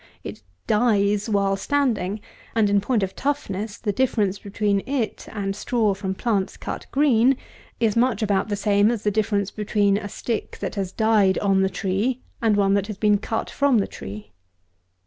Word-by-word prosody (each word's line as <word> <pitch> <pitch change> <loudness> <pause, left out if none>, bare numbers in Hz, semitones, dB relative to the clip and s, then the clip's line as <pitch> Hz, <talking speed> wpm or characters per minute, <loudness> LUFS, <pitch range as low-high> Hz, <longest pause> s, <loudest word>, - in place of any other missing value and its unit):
It - - -8 0.2
dies 210 - +2
while 200 -2 +2
standing, 215 -4 0 0.3
and, 215 -3 +3
in 200 0 +3
point 220 0 +1
of 190 - -3
toughness, 220 -7 -3
the 210 - -2
difference 205 -4 0
between 200 0 0
it 260 -6 -2
and 195 -2 -3
straw 225 -3 +1
from 190 -1 -4
plants 200 -3 -1
cut - - -6
green 265 -2 +4 0.4
is 225 -3 +2
much 235 -2 +2
about 205 0 +1
the 205 - 0
same 205 +1 +3
as 230 -3 -2
the 210 - +2
difference 200 -2 0
between 205 -1 +1
a 205 -1 -5
stick 230 +2 -4
that - - -4
has 195 -3 -3
died 215 -3 +3
on 195 -1 +2
the 190 - +2
tree, 205 +8 -1 0.2
and 220 -3 +3
one 195 -1 +3
that 200 0 +1
has 210 -3 -6
been 210 -1 +3
cut 225 +1 -3
from 280 -4 +3
the 200 - +2
tree. 105 +2 -9
205 Hz, 180 wpm, -23 LUFS, 195-225 Hz, 0.4 s, green